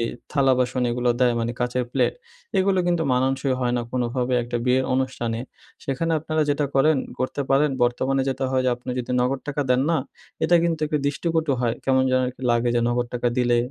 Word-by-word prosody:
এই 115 - 0 0.2
থালা 135 -2 +3
বাসন 125 0 0
এগুলো 120 +1 +1
দেয়। 125 -1 +4
মানি 115 +1 -1
কাঁচের 125 +1 0
প্লেট, - - +1 0.4
এগুলো, 190 0 +2
কিন্তু 175 -2 +1
মানানসই 130 +1 +1
হয় 125 -1 0
না, 120 - -1
কোনোভাবে 125 0 -1
একটা 120 0 -3
বিয়ের 130 +1 +2
অনুষ্ঠানে। 120 -3 -2 0.4
সেখানে 165 +5 -1
আপনারা 155 0 -1
যেটা 145 +1 +1
করেন 150 +3 +4 0.2
করতে 130 +2 -2
পারেন, 140 +2 +4
বর্তমানে 130 +2 +1
যেটা 135 0 -2
হয় 130 -1 +1
যে, 130 - +3
আপনি 125 - -15
যদি 125 - -4
নগদ 130 +2 0
টাকা 145 0 -1
দেন 125 0 +4
না, 165 - +3 0.5
এটা 175 +2 +5
কিন্তু 165 -2 0
একটু 150 0 0
দৃষ্টিকটু 160 +1 0
হয়। 120 -2 +1
কেমন 130 -1 +3
যেন 130 0 +3
একটু 130 - -16
লাগে 120 0 +2
যে, 120 - +2
নগদ 120 0 0
টাকা 120 0 +1
দিলে 120 -1 +3
130 Hz, 200 wpm, -23 LUFS, 125-145 Hz, 0.5 s, এটা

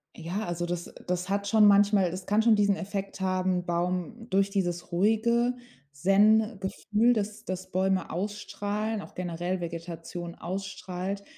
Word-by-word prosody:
Ja, 180 +6 -4
also 175 0 -2
das 175 0 -4
das 180 +1 -1
hat 200 0 0
schon 215 +1 +5
manchmal 200 -2 +5
das 185 +1 -6
kann 210 +2 +3
schon 225 -1 +5
diesen 205 -1 +3
Effekt 195 0 -5
haben 185 -1 0
Baum 180 +6 -2
durch 195 +1 +2
dieses 175 -3 -2
ruhige 225 +6 +2 0.4
Zen-Gefühl, 210 +5 +3
das 215 0 -3
das 185 0 -5
Bäume 190 0 +1
ausstrahlen, 205 +3 -3
auch - - -12
generell 175 +1 -3
Vegetation 170 0 -6
ausstrahlt, 190 +1 -5
195 Hz, 135 wpm, -28 LUFS, 180-210 Hz, 0.4 s, schon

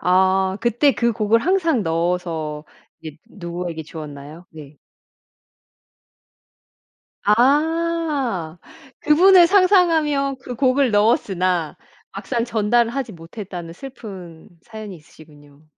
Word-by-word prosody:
아 190 +1 +2
그때 240 +5 +2
그 235 -1 0
곡을 220 +1 +1
항상 330 - +1
넣어서 165 -2 -2 0.4
이게 155 -1 -10
누구에게 170 -3 -6
주었나요? 150 +1 -10
네. 150 -2 -13 2.5
아 280 - 0 0.4
그분을 350 +4 +6
상상하며 330 -8 +2
그 250 - -7
곡을 260 0 +2
넣었으나 185 -6 +1 0.4
막상 235 -3 -3
전달을 235 +1 +1
하지 265 -5 -4
못했다는 170 0 -9
슬픈 185 -8 -11
사연이 215 -5 -9
있으시군요. 150 -1 -19
210 Hz, 220 characters per minute, -20 LUFS, 165-275 Hz, 2.5 s, 그분을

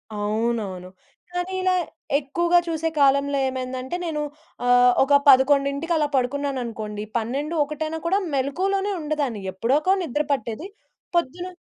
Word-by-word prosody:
అవునవును. 210 -3 -2 0.4
కానీ 355 +1 -3
ఇలా 370 0 +2 0.4
ఎక్కువగా 345 +5 +2
చూసే 325 0 -1
కాలంలో 280 0 +3
ఏమైందంటే 260 +2 -4
నేను 305 -2 -2 0.4
ఆహ్, 245 0 +6
ఒక 285 - +1
11కి 280 +4 +4
అలా 300 -1 +2
పడుకున్నాననుకోండి. 245 -6 -2
12 275 +8 -2
ఒకటైనా 310 +2 -4
కూడా 385 +4 +2
మెళకువలోనే 385 +9 0
ఉండదాన్ని 295 -8 -2
ఎప్పుడోకో 280 - +2
నిద్ర 295 0 -1
పట్టేది. 240 - -2 0.5
పొద్దున 345 +2 0
280 Hz, 115 wpm, -23 LUFS, 245-320 Hz, 0.5 s, ఆహ్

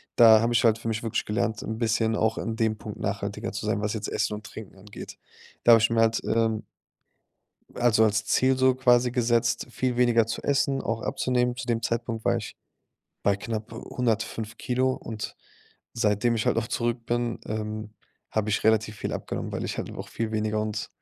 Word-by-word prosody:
Da 110 -2 +8
habe 115 +1 +1
ich 120 - +3
halt 115 -2 +4
für 115 - -6
mich 110 0 -2
wirklich 115 - -1
gelernt, 110 0 -1
'n 110 - -4
bisschen 115 -1 +1
auch 110 +1 +1
in 115 -1 -3
dem 110 -1 0
Punkt - - -8
nachhaltiger - - -3
zu - - -5
sein, 105 - 0
was 105 - -1
jetzt 105 -2 -4
Essen 105 - -1
und 105 0 -9
Trinken 105 -3 -10
angeht. 100 +2 -10 0.5
Da 120 - +9
habe 115 - +6
ich 115 - +3
mir 115 -1 +1
halt, 115 0 +2
ähm 115 -1 +1 1.1
also, 115 -2 +4
als 105 -1 +1
Ziel 130 0 +3
so 130 0 +4
quasi 125 -1 +4
gesetzt, 120 -1 +1
viel 125 0 -1
weniger 120 -2 +4
zu 115 - -4
essen, 135 -1 +1
auch 115 0 -2
abzunehmen. 125 -1 0
Zu 130 - -5
dem 115 -2 0
Zeitpunkt 115 -1 -2
war - - +3
ich - - -6 0.7
bei 100 -1 +3
knapp 110 +1 -5
105 115 -1 -2
Kilo 130 +1 0
und 110 -1 -6 0.6
seitdem 115 +1 +1
ich 110 - -1
halt - - +2
auch 115 0 -1
zurück 120 0 -1
bin, 120 -1 -1
ähm, 110 0 -4 0.4
habe 110 -1 -1
ich 105 - 0
relativ 110 -1 +2
viel - - -4
abgenommen, - - -4
weil - - -3
ich - - -3
halt - - -4
auch - - -7
viel 110 -1 -3
weniger 110 0 0
und, 105 -1 -3
115 Hz, 200 wpm, -26 LUFS, 110-120 Hz, 1.1 s, Da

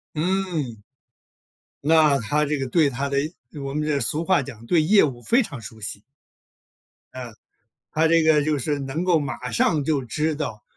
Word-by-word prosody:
嗯。 160 - -2 1.0
那 155 -3 +5
他 150 +6 0
这 150 0 -1
个 135 - -2
对 155 -2 +3
他 140 +2 -3
的 140 - -1 0.4
我 135 0 -5
们 150 - -1
这 145 -2 0
俗 150 +7 -1
话 185 -4 +3
讲 115 -4 -10
对 165 +5 +3
业 200 +6 +5
务 125 -5 -2
非 245 - +3
常 140 - -7
熟 110 0 -11
悉。 100 0 -4 1.1
嗯， 125 -2 -7 0.6
他 160 +1 +2
这 165 0 +4
个 155 -2 +4
就 155 -1 0
是 145 +2 -1
能 140 +5 -3
够 180 -3 +3
马 135 -3 -4
上 145 +7 +1
就 140 -2 0
知 155 +6 -1
道， 115 -9 -5
145 Hz, 190 characters per minute, -23 LUFS, 130-160 Hz, 1.1 s, 那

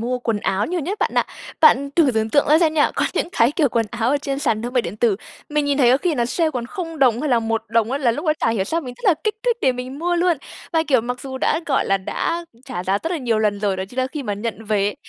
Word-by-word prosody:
mua 250 +2 -1
quần 230 -3 -1
áo 195 +2 0
nhiều 355 0 -2
nhất 385 +8 -3
bạn - - +1
ạ. - - +2 0.3
Bạn 280 -3 +5
thử 315 -6 +5
tưởng 220 -2 -1
tượng 285 +1 +3
ra 310 +2 +6
xem 320 -2 +2
nha, 295 - +3
có - - +2
những - - 0
cái 235 +5 +3
kiểu 300 -5 +2
quần 230 -1 0
áo 235 0 0
ở 290 - +3
trên 275 -1 -3
sàn 230 -7 0
thương 245 - -4
mại 250 -2 +2
điện 180 +5 -6
tử, 220 -3 +2 0.3
mình 300 -1 0
nhìn 285 0 0
thấy 245 -3 +5
có 260 - +5
khi 325 +2 0
nó 240 -3 +1
sale 320 +6 0
còn 245 -5 -4
0 330 +2 -6
đồng 250 -3 +3
hay 300 -2 -1
là 240 - +4
1 225 0 -1
đồng 225 +1 +1
á 280 - 0
là 255 -4 +2
lúc 300 +7 -5
đó 305 - +4
chả - - +2
hiểu 205 -4 0
sao 330 +10 -1
mình 250 -4 -8
rất 460 - -15
là 345 - +6
kích 430 - +1
thích 480 -2 +1
để 260 - +3
mình 255 +3 -6
mua 350 +1 0
luôn. 345 -1 +2 0.4
Và, 325 -1 +3
kiểu, 260 -4 +4
mặc 245 +2 -4
dù 265 -1 -6
đã, 310 - +1
gọi 270 - +1
là, 195 0 +2
đã 335 - -2 0.2
trả 245 -10 -5
giá 195 +2 +1
rất 330 - -2
là 335 - -1
nhiều 235 -4 0
lần 210 -2 0
rồi, 200 -2 0
đó 190 - -3
chính 250 +5 -10
là 255 - +2
khi 290 +2 -6
mà 210 -5 -2
nhận 225 +1 -5
về, 205 -1 0
255 Hz, 315 wpm, -21 LUFS, 225-305 Hz, 0.4 s, ra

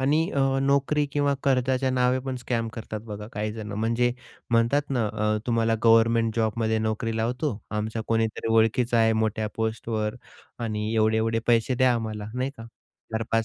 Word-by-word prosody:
आणि 150 +5 +2
अ, 140 - -2 0.2
नोकरी 140 +2 +2
किंवा 145 -1 +2
कर्जाच्या 130 0 +1
नावे 125 0 +2
पण 130 -1 -3
स्कॅम 120 -2 -2
करतात 110 -2 -6
बघा 105 -1 -7
काही 105 +1 -3
जण, 110 -2 -6
म्हणजे 115 +3 +1 0.4
म्हणतात 120 +5 +2
ना, 120 -5 +1
अ, 105 0 0
तुम्हाला 115 -1 +2
गव्हर्नमेंट 115 0 +4
जॉबमध्ये 110 0 +1
नोकरी 110 +1 -2
लावतो. 120 +2 -1
आमच्या 110 +1 -2
कोणीतरी 115 0 0
ओळखीचा 115 +2 +3
आहे 115 0 +4
मोठ्या 110 0 -1
पोस्टवर 110 0 -2 0.5
आणि 110 0 -2
एवढे-एवढे 110 +1 +2
पैसे 120 +2 +3
द्या 130 0 +4
आम्हाला 110 -2 -4
नाही 130 +2 -1
का, 115 - -9 0.5
4-5 115 0 0
115 Hz, 155 wpm, -25 LUFS, 110-125 Hz, 0.5 s, गव्हर्नमेंट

